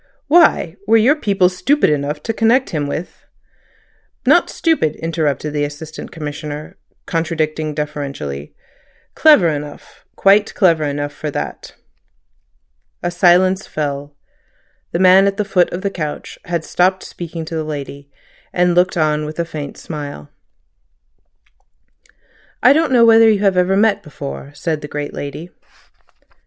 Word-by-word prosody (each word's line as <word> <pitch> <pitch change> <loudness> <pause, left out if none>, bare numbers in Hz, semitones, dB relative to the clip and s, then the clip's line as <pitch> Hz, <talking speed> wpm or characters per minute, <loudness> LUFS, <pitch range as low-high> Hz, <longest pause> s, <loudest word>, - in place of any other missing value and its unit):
"Why? 295 - +3
Were 225 +1 +5
your 245 +7 +4
people 200 -10 +2
stupid 185 - +1
enough 150 +1 -2
to 225 - -2
connect 235 +3 +2
him 150 -4 -2
with—" 155 +5 -6 1.0
"Not - - +4
stupid," 315 - 0
interrupted 155 -3 -2
the 145 -1 0
Assistant 150 +2 -7
Commissioner, 150 -1 -7 0.3
contradicting 155 -2 -2
deferentially. 140 - -5 0.6
"Clever 300 - +5
enough—quite 165 +7 0
clever 165 -6 +3
enough 145 0 -3
for 150 +1 -5
that." - - -6 1.3
A 175 - -1
silence 180 +2 +3
fell. 145 -1 -4 0.8
The - - -1
man 190 +2 +6
at 200 0 -1
the 210 - -1
foot 185 -3 +2
of 180 - -5
the 200 - -1
couch 155 -5 -6
had 170 -3 -2
stopped 185 +1 +1
speaking 165 -1 -7
to 165 - -6
the 160 - -2
lady, 140 -2 -7 0.4
and 180 0 +2
looked 180 +1 +2
on 155 -1 +1
with 150 +1 -7
a 170 - 0
faint 150 -3 -7
smile. 145 - -8 2.3
"I 255 - +7
don't 315 -1 +1
know 240 -2 +5
whether 225 0 +6
you 210 -2 +1
ever 190 0 +2
met 215 0 +3
before," 70 - -8
said 155 -2 -3
the 150 - -7
great 145 0 -5
lady. 155 +5 -7
165 Hz, 135 wpm, -18 LUFS, 150-190 Hz, 2.3 s, I